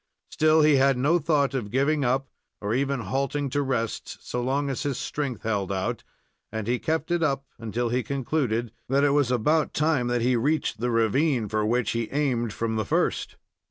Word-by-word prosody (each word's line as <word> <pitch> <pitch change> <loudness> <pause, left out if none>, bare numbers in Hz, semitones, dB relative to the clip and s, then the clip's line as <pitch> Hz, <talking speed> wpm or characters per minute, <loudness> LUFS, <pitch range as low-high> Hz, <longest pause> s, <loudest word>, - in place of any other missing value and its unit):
Still, 155 0 +4
he 150 -2 +5
had 135 -1 +4
no 150 +7 +3
thought 145 -3 +1
of 120 -6 -3
giving 140 +5 +1
up, 130 +2 +1 0.3
or 105 +1 -2
even 135 +1 0
halting 135 +6 -2
to 145 - +1
rest, 125 -5 -2
so 125 - -2
long 135 +3 0
as 135 -2 -2
his 140 -4 -2
strength 135 -7 -3
held 100 -4 -1
out, 95 -1 -2 0.5
and 110 -2 -3
he 120 +2 0
kept 160 +1 -1
it 175 -1 +1
up 140 -3 0
until 115 +2 -2
he 125 +2 +1
concluded 125 -3 -1 0.2
that 140 +2 +3
it 145 - +4
was 145 -3 +2
about 145 +6 +1
time 150 -5 +2
that 120 -1 0
he 125 +1 +3
reached 140 -1 0
the 125 +2 0
ravine 115 +2 +2
for 110 +1 0
which 120 +2 +1
he 115 -1 -2
aimed 130 -6 0
from 110 +1 -2
the 110 - -1
first. - - 0
130 Hz, 195 wpm, -26 LUFS, 115-145 Hz, 0.5 s, he